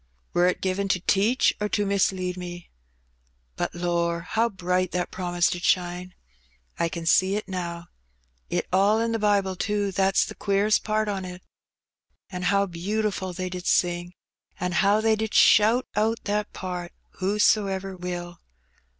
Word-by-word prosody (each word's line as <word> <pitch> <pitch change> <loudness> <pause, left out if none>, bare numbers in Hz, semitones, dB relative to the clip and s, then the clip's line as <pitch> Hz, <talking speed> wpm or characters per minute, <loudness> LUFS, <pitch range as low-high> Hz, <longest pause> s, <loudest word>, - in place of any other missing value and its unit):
Wur 175 +1 +4
it 180 - 0
given 190 +1 -1
to 190 - +1
teach 205 +7 +3
or 210 - 0
to 205 0 0
mis 200 -1 +2
lead 185 -1 -3
me? 175 -1 -8 0.8
But, - - -3
lor', 170 -1 0
how 225 +6 0
bright 185 -1 -1
that 180 -1 -2
promise 175 -1 0
did 175 - -4
shine! 180 0 0 0.6
I 170 - +1
ken 170 -1 -6
see 185 +4 +3
it 210 - -3
now. 175 -2 -5 0.6
It - - -1
are 205 +4 +4
in 230 - -1
the 225 - -1
Bible, 200 -3 +1
too, 205 +1 -1
that's 195 0 +2
the - - -8
queerest 200 +2 +1
part 215 0 0
on 195 -2 -2
it. 180 0 -8 0.9
An' 180 -1 -5
how 200 +2 +2
beautiful 195 +2 -2
they 185 +1 -4
did 180 0 -6
sing, 175 0 +1 0.4
an' 180 0 -1
how 200 +4 +3
they 220 0 +3
did 220 0 -3
shout 220 +5 +5
out 220 +2 0
that 210 0 -2
part, 180 -2 -6 0.3
'Whosoever 195 -1 +1
will.' 175 -1 -6
190 Hz, 160 wpm, -25 LUFS, 180-205 Hz, 0.9 s, shout